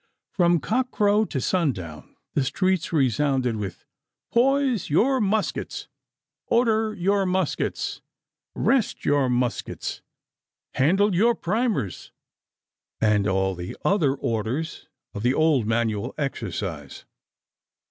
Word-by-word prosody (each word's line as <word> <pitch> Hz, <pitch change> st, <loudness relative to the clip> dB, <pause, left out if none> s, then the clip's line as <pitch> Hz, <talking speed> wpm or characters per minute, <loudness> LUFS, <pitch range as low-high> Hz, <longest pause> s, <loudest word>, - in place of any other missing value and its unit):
From 175 Hz, -2 st, +3 dB
cock 250 Hz, -, 0 dB
crow 210 Hz, -1 st, +2 dB
to 140 Hz, -, -3 dB
sun 165 Hz, 0 st, +1 dB
down 80 Hz, -6 st, -10 dB, 0.2 s
the 140 Hz, -, +1 dB
streets 185 Hz, +5 st, 0 dB
resounded 135 Hz, -4 st, +1 dB
with 100 Hz, -3 st, -6 dB, 0.5 s
'Poise 260 Hz, -3 st, +2 dB
your 250 Hz, -, +3 dB
muskets! 210 Hz, +1 st, -1 dB, 0.6 s
Order 220 Hz, -2 st, +2 dB
your 195 Hz, +1 st, +1 dB
muskets! 185 Hz, -3 st, -1 dB, 0.5 s
Rest 260 Hz, -5 st, +1 dB
your 145 Hz, -3 st, +2 dB
muskets! 125 Hz, -1 st, -2 dB, 0.7 s
Handle 195 Hz, +9 st, +3 dB
your 230 Hz, +6 st, +3 dB
primers!' 210 Hz, -, -2 dB, 0.9 s
and 105 Hz, -2 st, +2 dB
all 95 Hz, 0 st, +1 dB
the 90 Hz, 0 st, -7 dB
other 155 Hz, -9 st, +2 dB
orders 120 Hz, +6 st, -3 dB, 0.3 s
of 100 Hz, -, -5 dB
the 125 Hz, +4 st, +2 dB
old 155 Hz, -8 st, +3 dB
manual 115 Hz, -2 st, -1 dB
exercise. 95 Hz, -, -4 dB
155 Hz, 105 wpm, -24 LUFS, -, 0.9 s, From